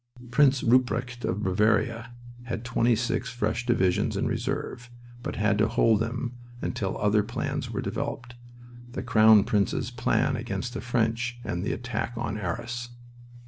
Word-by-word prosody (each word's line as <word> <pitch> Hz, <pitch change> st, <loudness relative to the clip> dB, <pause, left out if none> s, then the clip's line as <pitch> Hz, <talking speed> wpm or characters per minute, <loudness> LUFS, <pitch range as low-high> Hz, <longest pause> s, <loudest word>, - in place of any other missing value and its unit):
Prince 135 Hz, 0 st, +4 dB
Rupprecht 125 Hz, 0 st, +2 dB
of 105 Hz, +3 st, -1 dB
Bavaria 110 Hz, +5 st, +1 dB, 0.3 s
had 115 Hz, -1 st, -4 dB
twenty 120 Hz, 0 st, +2 dB
six 120 Hz, +2 st, -1 dB
fresh 120 Hz, +1 st, -2 dB
divisions 95 Hz, -7 st, +2 dB
in -, -, 0 dB
reserve, 125 Hz, 0 st, -3 dB, 0.3 s
but -, -, -4 dB
had 105 Hz, 0 st, +1 dB
to 110 Hz, -, +4 dB
hold 115 Hz, -2 st, +3 dB
them 120 Hz, +2 st, -3 dB, 0.2 s
until 95 Hz, -5 st, -2 dB
other 105 Hz, 0 st, +3 dB
plans 115 Hz, +4 st, -3 dB
were -, -, -3 dB
developed 120 Hz, 0 st, -4 dB, 0.6 s
the -, -, -4 dB
Crown 110 Hz, -3 st, +6 dB
Prince's 100 Hz, -2 st, 0 dB
plan -, -, +1 dB
against 125 Hz, -1 st, -4 dB
the -, -, -4 dB
French, 120 Hz, 0 st, 0 dB
and 90 Hz, -4 st, -3 dB
the -, -, -1 dB
attack 120 Hz, 0 st, -3 dB
on 110 Hz, -3 st, -2 dB
Arras. 120 Hz, +6 st, -4 dB
115 Hz, 145 wpm, -27 LUFS, 105-120 Hz, 0.6 s, Crown